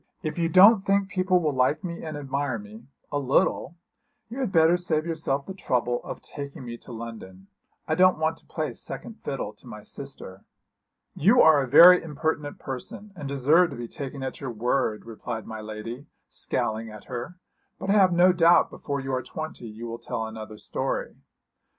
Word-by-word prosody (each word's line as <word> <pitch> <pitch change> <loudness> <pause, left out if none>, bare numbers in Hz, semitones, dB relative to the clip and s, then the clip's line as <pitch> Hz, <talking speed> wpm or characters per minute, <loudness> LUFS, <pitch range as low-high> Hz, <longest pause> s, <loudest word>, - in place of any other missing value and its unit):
'If 155 +1 -3
you 165 -1 +1
don't 195 +6 +8
think 195 0 +1
people 185 -1 +2
will 155 -4 0
like 130 +7 +1
me 170 -2 -5
and 155 -2 -5
admire 140 -3 -2
me 110 +3 -12 0.2
a 145 - 0
little 140 +3 +1 0.6
you 250 - -5
had 255 -7 -1
better 165 0 +5
save 165 -3 0
yourself 155 -4 -2
the 190 - -6
trouble 125 -9 -1
of - - -8
taking 140 -3 -7
me 120 -1 -6
to 125 - -13
London. 110 -5 -9 0.4
I - - +1
don't 185 0 +5
want 160 +1 0
to - - -17
play 155 -2 -3
second 230 - -5
fiddle 130 -6 -4
to 110 - -19
my 105 -3 -9
sister.' 105 -7 -8 0.7
'You 220 - +5
are 155 -3 +6
a 135 - -2
very 175 +7 +9
impertinent 150 -1 -3
person, 145 +10 -7
and 140 - -6
deserve 145 +6 +4
to - - -7
be 120 -1 -6
taken 135 +2 -6
at 130 - -5
your 135 - -4
word,' 120 -1 -1
replied 115 0 -6
my 110 -1 -7
lady, 110 +5 -7 0.2
scowling 110 +1 -2
at 105 -1 -11
her; 125 +8 -6 0.4
'but 195 - -2
I - - +5
have 195 -3 +5
no 180 +1 +5
doubt 170 0 +5
before 140 -1 -4
you 135 0 -4
are 130 - 0
twenty 155 -4 -7
you 110 +2 -8
will 115 0 -6
tell 110 - -4
another 110 -1 -8
story.' - - -3
140 Hz, 190 wpm, -26 LUFS, 120-170 Hz, 0.7 s, very